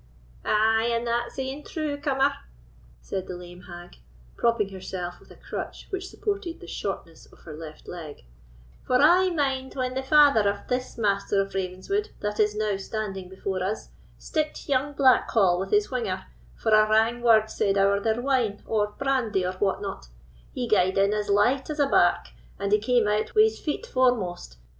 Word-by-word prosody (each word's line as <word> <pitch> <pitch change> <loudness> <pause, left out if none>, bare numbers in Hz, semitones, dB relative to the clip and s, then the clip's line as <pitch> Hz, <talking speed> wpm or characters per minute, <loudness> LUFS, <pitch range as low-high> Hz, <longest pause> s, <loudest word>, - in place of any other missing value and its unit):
"Ay! 225 +2 +3
and 235 0 -1
that's 240 +1 -2
e'en 265 +2 -4
true, 305 -3 -3
cummer," 280 -1 +1 0.7
said 190 - -4
the 180 - -5
lame 175 0 -11
hag, 175 0 -11 0.4
propping 230 -4 +1
herself 185 -2 -6
with - - -20
a - - -14
crutch - - -7
which 380 -1 -3
supported 400 -5 -3
the - - -11
shortness 170 -2 -6
of - - -20
her 155 - -10
left 155 0 -10
leg, 160 -4 -8 0.6
"for 255 - -1
I 355 +6 +5
mind 270 -5 -1
when 255 -1 -2
the 265 - -2
father 275 -7 +5
of 200 0 -5
this 255 +1 -3
Master 200 -2 +1
of 195 0 -1
Ravenswood 195 - -2
that 210 0 -3
is 210 -1 +2
now 210 -2 0
standing 195 -2 -5
before 190 0 -3
us 205 +4 -3 0.3
sticked 310 -2 -3
young 280 +1 0
Blackhall 225 -9 +4
with 190 +1 -3
his 210 +3 +2
whinger, 225 -7 -2 0.3
for 220 - -1
a 215 0 +5
wrang 225 +2 +3
word 220 -2 +4
said 200 -2 +1
ower 200 +1 +3
their 220 +2 0
wine, 245 -6 0
or 210 -2 +1
brandy, 250 -9 0
or 180 - -1
what 200 0 0
not: 130 - -6 0.4
he 245 -1 -3
gaed 190 -4 +2
in 200 +1 +3
as 210 -1 -2
light 245 +8 +2
as 305 - -3
a 290 - +3
lark, 275 - +3 0.3
and 200 0 -2
he 210 - +5
came 235 0 +2
out 210 - -1
wi' 430 - +7
his 440 - +1
feet 310 +9 -3
foremost. 215 - 0
215 Hz, 180 wpm, -26 LUFS, 195-265 Hz, 0.7 s, wi